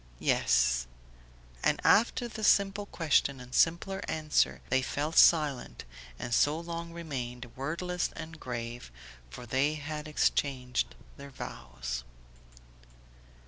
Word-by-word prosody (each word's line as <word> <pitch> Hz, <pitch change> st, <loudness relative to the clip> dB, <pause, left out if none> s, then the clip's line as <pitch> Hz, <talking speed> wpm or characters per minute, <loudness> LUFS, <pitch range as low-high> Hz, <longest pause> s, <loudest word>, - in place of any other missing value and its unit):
"Yes." -, -, +2 dB, 0.8 s
And -, -, +2 dB
after 240 Hz, +2 st, +4 dB
the 220 Hz, -1 st, -7 dB
simple 200 Hz, 0 st, +3 dB
question 145 Hz, -6 st, +1 dB
and 125 Hz, 0 st, -11 dB
simpler 185 Hz, +4 st, +2 dB
answer 155 Hz, -1 st, +1 dB
they 130 Hz, -, +3 dB
fell 145 Hz, +4 st, -2 dB
silent 150 Hz, -5 st, +4 dB, 0.3 s
and 120 Hz, -, -4 dB
so 150 Hz, +6 st, +3 dB
long 170 Hz, 0 st, -6 dB
remained, 125 Hz, -7 st, -6 dB
wordless 170 Hz, +6 st, -2 dB
and 165 Hz, -1 st, -8 dB
grave, 120 Hz, -, -6 dB, 0.4 s
for 120 Hz, -, -9 dB
they 135 Hz, +6 st, +1 dB
had 150 Hz, 0 st, -5 dB
exchanged 125 Hz, -, 0 dB, 0.2 s
their 140 Hz, 0 st, -9 dB
vows. 60 Hz, -, -6 dB
145 Hz, 110 wpm, -30 LUFS, 125-165 Hz, 0.8 s, after